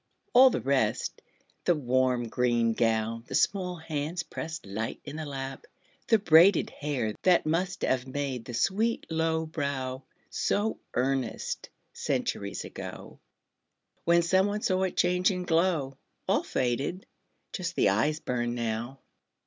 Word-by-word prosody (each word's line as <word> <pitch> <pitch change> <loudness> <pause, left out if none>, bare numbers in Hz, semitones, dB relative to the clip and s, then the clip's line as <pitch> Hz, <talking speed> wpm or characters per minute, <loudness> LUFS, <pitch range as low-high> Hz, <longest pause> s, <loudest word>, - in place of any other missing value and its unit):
All 260 +1 +9
the - - -2
rest 130 -6 0 0.4
The 175 - +4
warm 130 -3 +1
green 120 -1 +1
gown, 115 0 0
the - - -4
small 180 -3 +1
hands 160 +1 -3
pressed 160 0 -6
Light 105 +3 -4
in 145 +1 -7
the 155 -1 -5
lap, 135 -1 -6 0.4
the 225 - +5
braided 180 -1 +5
hair 130 -7 -2
That 180 -2 +4
must 180 +4 -1
have 130 0 +1
made 130 -3 -3
the 120 - -6
sweet 220 - +1
low 160 0 +1
brow 140 -4 -3 0.3
So 210 +2 0 0.2
earnest, 130 -2 -1 0.2
centuries - - -2
ago, - - -8 0.8
When 170 0 +4
some 190 +3 +3
one 210 +1 -2
saw 185 0 +1
it 185 - -4
change 180 +1 +3
and 180 -2 -2
glow 165 -6 +1 0.3
All - - +3
faded! 135 +9 -2 0.5
Just 175 -1 -3
the - - +4
eyes 130 +11 +1
burn 120 -3 -2
now. 120 +3 -3
145 Hz, 140 wpm, -28 LUFS, 125-175 Hz, 0.8 s, All